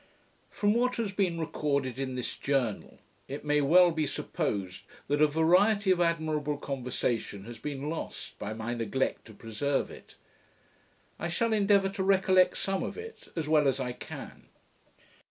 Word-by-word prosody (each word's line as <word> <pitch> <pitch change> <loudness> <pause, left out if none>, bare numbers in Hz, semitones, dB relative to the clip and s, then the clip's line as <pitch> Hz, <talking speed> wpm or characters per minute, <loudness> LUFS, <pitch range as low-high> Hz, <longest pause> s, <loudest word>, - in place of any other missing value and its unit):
From 205 0 +1
what 250 +2 +1
has 225 -4 -2
been 185 -4 0
recorded 140 -5 -1
in 130 -1 -3
this 125 - -3
Journal, 130 -7 -1 0.3
it 140 +2 -6
may 150 0 +3
well 175 +5 +6
be 160 -2 -1
supposed 95 -7 -3 0.3
that 145 +1 +1
a 155 - +7
variety 185 +7 +4
of 180 -1 +3
admirable 155 -3 0
conversation 125 -7 -3
has 120 0 -9
been 145 -1 -4
lost, 160 +1 -6
by 105 - -4
my 115 +2 -3
neglect 120 +3 -1
to 110 - -12
preserve 125 +6 -2
it. - - -13 1.0
I 170 - -2
shall 220 +7 0
endeavour 200 -2 +4
to 195 0 -3
recollect 190 -1 +4
some 195 -1 -1
of - - -4
it, 450 0 -9
as 160 -3 -2
well 150 -2 +4
as 135 0 +1
I 125 -2 -2
can. - - -9
150 Hz, 160 wpm, -29 LUFS, 130-190 Hz, 1.0 s, a